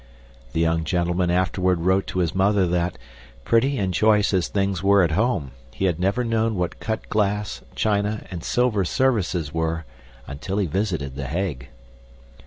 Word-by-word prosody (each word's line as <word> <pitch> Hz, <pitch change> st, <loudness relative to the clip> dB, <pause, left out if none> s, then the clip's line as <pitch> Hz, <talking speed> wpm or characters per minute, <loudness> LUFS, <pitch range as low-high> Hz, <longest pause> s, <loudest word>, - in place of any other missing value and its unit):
The 80 Hz, -, -1 dB
young 80 Hz, 0 st, +2 dB
gentleman 90 Hz, +2 st, 0 dB
afterward 90 Hz, 0 st, +1 dB
wrote 95 Hz, +2 st, +2 dB
to 95 Hz, -, -3 dB
his 85 Hz, -3 st, 0 dB
mother 95 Hz, 0 st, +3 dB
that, 90 Hz, 0 st, -1 dB, 0.5 s
pretty 130 Hz, -, +2 dB
and 95 Hz, -4 st, -1 dB
choice 105 Hz, +2 st, +3 dB
as 90 Hz, -2 st, +2 dB
things 100 Hz, -3 st, -1 dB
were 100 Hz, 0 st, +5 dB
at 85 Hz, -, +1 dB
home, 95 Hz, -, 0 dB, 0.2 s
he 95 Hz, -, -1 dB
had 90 Hz, -3 st, 0 dB
never 100 Hz, +6 st, +1 dB
known 115 Hz, -1 st, 0 dB
what 90 Hz, -2 st, -2 dB
cut 110 Hz, -1 st, -3 dB
glass, 105 Hz, -1 st, -1 dB
china, 105 Hz, 0 st, 0 dB
and 85 Hz, -3 st, -6 dB
silver 120 Hz, -5 st, +1 dB
services 95 Hz, -, 0 dB
were 80 Hz, 0 st, -1 dB, 0.4 s
until 80 Hz, +8 st, -5 dB
he 100 Hz, -, +2 dB
visited 85 Hz, -6 st, -2 dB
The 70 Hz, -1 st, -4 dB
Hague. 75 Hz, -5 st, -3 dB
95 Hz, 165 wpm, -23 LUFS, 85-105 Hz, 0.5 s, were